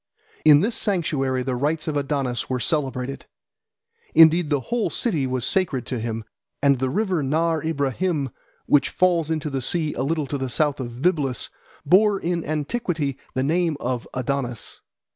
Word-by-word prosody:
In 150 Hz, -1 st, +7 dB
this 225 Hz, +4 st, 0 dB
sanctuary 140 Hz, -, 0 dB
the 130 Hz, -1 st, -2 dB
rites 155 Hz, +5 st, -1 dB
of 155 Hz, -, -1 dB
Adonis 135 Hz, -4 st, -1 dB
were 130 Hz, -1 st, -1 dB
celebrated. 135 Hz, -2 st, -2 dB, 0.9 s
Indeed 165 Hz, 0 st, +6 dB
the 145 Hz, -2 st, +2 dB
whole 240 Hz, -2 st, +1 dB
city 160 Hz, -, -1 dB
was 130 Hz, -1 st, -1 dB
sacred 155 Hz, -10 st, 0 dB
to 125 Hz, -, -3 dB
him, 115 Hz, 0 st, -3 dB, 0.4 s
and 140 Hz, -2 st, +3 dB
the 130 Hz, 0 st, 0 dB
river 185 Hz, +1 st, 0 dB
Nahr 160 Hz, +3 st, +1 dB
Ibrahim, 145 Hz, -1 st, -1 dB, 0.3 s
which 145 Hz, -, +3 dB
falls 175 Hz, -4 st, +2 dB
into 155 Hz, -2 st, -2 dB
the 135 Hz, -1 st, -2 dB
sea 155 Hz, +3 st, -1 dB
a -, -, -3 dB
little 155 Hz, +2 st, 0 dB
to 140 Hz, +1 st, -4 dB
the 130 Hz, -1 st, -2 dB
south 145 Hz, +2 st, 0 dB
of 120 Hz, +1 st, -6 dB
Byblus, 150 Hz, -8 st, +1 dB, 0.4 s
bore 200 Hz, +5 st, +4 dB
in 170 Hz, -1 st, -1 dB
antiquity 155 Hz, -, -2 dB, 0.2 s
the 130 Hz, -, +1 dB
name 165 Hz, +1 st, +1 dB
of 125 Hz, -1 st, -3 dB
Adonis. 125 Hz, -2 st, -3 dB
145 Hz, 160 wpm, -23 LUFS, 130-165 Hz, 0.9 s, In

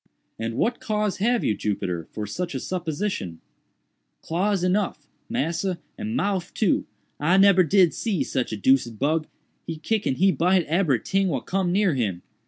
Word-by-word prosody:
"And 115 Hz, 0 st, -3 dB
what 240 Hz, -, 0 dB
cause 210 Hz, -2 st, -1 dB
have 235 Hz, +4 st, +1 dB
you, 105 Hz, -, +1 dB
Jupiter, 90 Hz, -5 st, -3 dB
for 105 Hz, -, -5 dB
such 170 Hz, -, -4 dB
a -, -, -1 dB
supposition?" 170 Hz, -, -3 dB, 0.8 s
"Claws 185 Hz, +3 st, 0 dB
enuff, 190 Hz, +2 st, 0 dB, 0.2 s
massa, 190 Hz, -5 st, -1 dB, 0.2 s
and 215 Hz, +2 st, -4 dB
mouff 190 Hz, -5 st, -1 dB
too. 210 Hz, -6 st, +1 dB, 0.3 s
I 170 Hz, +6 st, +3 dB
nebber 195 Hz, -1 st, +6 dB
did 180 Hz, +1 st, +4 dB
see 205 Hz, -8 st, -1 dB
sick 130 Hz, -3 st, -2 dB
a -, -, -2 dB
deuced 120 Hz, +1 st, +2 dB
bug—he 155 Hz, +3 st, -3 dB
kick 215 Hz, +6 st, -1 dB
and 130 Hz, -, 0 dB
he 195 Hz, +2 st, +4 dB
bite 180 Hz, +2 st, +2 dB
ebery 160 Hz, -6 st, +2 dB
ting 195 Hz, 0 st, +1 dB
what 140 Hz, -8 st, -2 dB
cum 190 Hz, -2 st, 0 dB
near 195 Hz, -2 st, +3 dB
him. 100 Hz, -9 st, -2 dB
175 Hz, 165 wpm, -24 LUFS, 135-195 Hz, 0.8 s, nebber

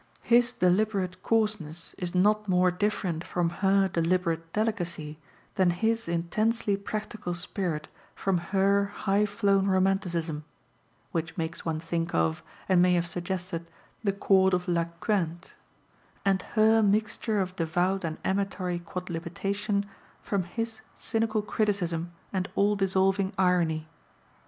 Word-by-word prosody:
His 240 Hz, +1 st, +4 dB
deliberate 185 Hz, -2 st, +1 dB
coarseness 210 Hz, -8 st, -1 dB
is 180 Hz, 0 st, -3 dB
not 210 Hz, +3 st, +3 dB
more 180 Hz, 0 st, +4 dB
different 180 Hz, -3 st, -1 dB
from 175 Hz, -3 st, -1 dB
her 195 Hz, 0 st, +4 dB
deliberate 165 Hz, -1 st, 0 dB
delicacy 175 Hz, -8 st, -2 dB, 0.3 s
than 190 Hz, -3 st, +3 dB
his 225 Hz, +6 st, 0 dB
intensely 205 Hz, +6 st, +1 dB
practical 210 Hz, -2 st, -4 dB
spirit 170 Hz, -3 st, -3 dB, 0.3 s
from 190 Hz, -3 st, +1 dB
her 200 Hz, +1 st, +3 dB
high 200 Hz, +1 st, 0 dB
flown 200 Hz, -2 st, +2 dB
romanticism 185 Hz, -5 st, +1 dB, 0.7 s
(which 165 Hz, +1 st, -3 dB
makes 165 Hz, 0 st, -4 dB
one 160 Hz, -1 st, -1 dB
think 165 Hz, +1 st, -2 dB
of, 80 Hz, -1 st, +1 dB, 0.3 s
and 185 Hz, -2 st, +5 dB
may 180 Hz, 0 st, +5 dB
have 170 Hz, -1 st, +1 dB
suggested, 175 Hz, -1 st, -4 dB, 0.4 s
the 200 Hz, -, +2 dB
Court 190 Hz, -1 st, +4 dB
of 180 Hz, 0 st, -3 dB
La 170 Hz, -1 st, +2 dB
Quinte), 170 Hz, 0 st, -2 dB, 0.7 s
and 195 Hz, -1 st, +3 dB, 0.2 s
her 220 Hz, +1 st, +6 dB
mixture 210 Hz, +1 st, +1 dB
of 185 Hz, -1 st, -2 dB
devout 180 Hz, +3 st, 0 dB
and 160 Hz, -2 st, -3 dB
amatory 190 Hz, -2 st, -1 dB
quodlibetation 185 Hz, +4 st, -3 dB, 0.3 s
from 200 Hz, -2 st, -1 dB
his 225 Hz, +5 st, -4 dB, 0.2 s
cynical 220 Hz, -1 st, 0 dB
criticism 175 Hz, -6 st, -1 dB, 0.2 s
and 190 Hz, -1 st, -1 dB
all 205 Hz, +1 st, +3 dB
dissolving 195 Hz, 0 st, +2 dB
irony. 170 Hz, -4 st, +2 dB
185 Hz, 125 wpm, -28 LUFS, 170-205 Hz, 0.7 s, her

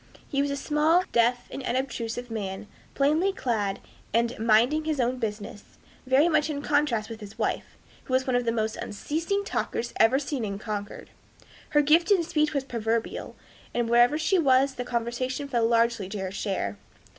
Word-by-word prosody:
He 275 Hz, -, 0 dB
was 285 Hz, -, 0 dB
a 280 Hz, -, -1 dB
small, 305 Hz, +5 st, +2 dB
deaf, 240 Hz, +1 st, +2 dB
and -, -, -5 dB
unobtrusive 245 Hz, -2 st, -3 dB
man, 200 Hz, -2 st, -4 dB, 0.3 s
plainly 310 Hz, +8 st, +2 dB
clad, 215 Hz, -, -1 dB, 0.4 s
and 235 Hz, +1 st, +2 dB
"minding 235 Hz, +8 st, +3 dB
his 310 Hz, -3 st, -1 dB
own 250 Hz, +1 st, +1 dB
business;" 210 Hz, -2 st, -6 dB, 0.3 s
very 270 Hz, +5 st, +5 dB
much 315 Hz, -2 st, +2 dB
in 285 Hz, -1 st, -3 dB
contrast 285 Hz, -8 st, +1 dB
with 225 Hz, -1 st, -8 dB
his 205 Hz, 0 st, -10 dB
wife, -, -, -2 dB, 0.3 s
who 255 Hz, -, -5 dB
was 260 Hz, 0 st, +1 dB
one 255 Hz, -, 0 dB
of 245 Hz, -, +2 dB
the 230 Hz, -, +1 dB
most 220 Hz, -1 st, -1 dB
unceasing 330 Hz, -, -2 dB
talkers 235 Hz, -, -2 dB
ever 225 Hz, +4 st, +5 dB
seen 275 Hz, -3 st, -3 dB
in 200 Hz, -2 st, -3 dB
Concord. 205 Hz, -1 st, -6 dB, 0.6 s
Her 295 Hz, -1 st, +4 dB
gift 325 Hz, +4 st, +4 dB
in 385 Hz, -4 st, +4 dB
speech 305 Hz, -2 st, +1 dB
was 280 Hz, -3 st, -1 dB
proverbial, 230 Hz, -3 st, -3 dB, 0.4 s
and 240 Hz, -1 st, +1 dB
wherever 240 Hz, +5 st, +4 dB
she 355 Hz, +4 st, +2 dB
was 270 Hz, -2 st, +4 dB
the 250 Hz, -, -4 dB
conversation 250 Hz, +3 st, -2 dB
fell 235 Hz, -4 st, +1 dB
largely 230 Hz, -4 st, +2 dB
to 210 Hz, -, -5 dB
her 190 Hz, -1 st, -3 dB
share. 190 Hz, -, -3 dB
245 Hz, 180 wpm, -26 LUFS, 225-290 Hz, 0.6 s, very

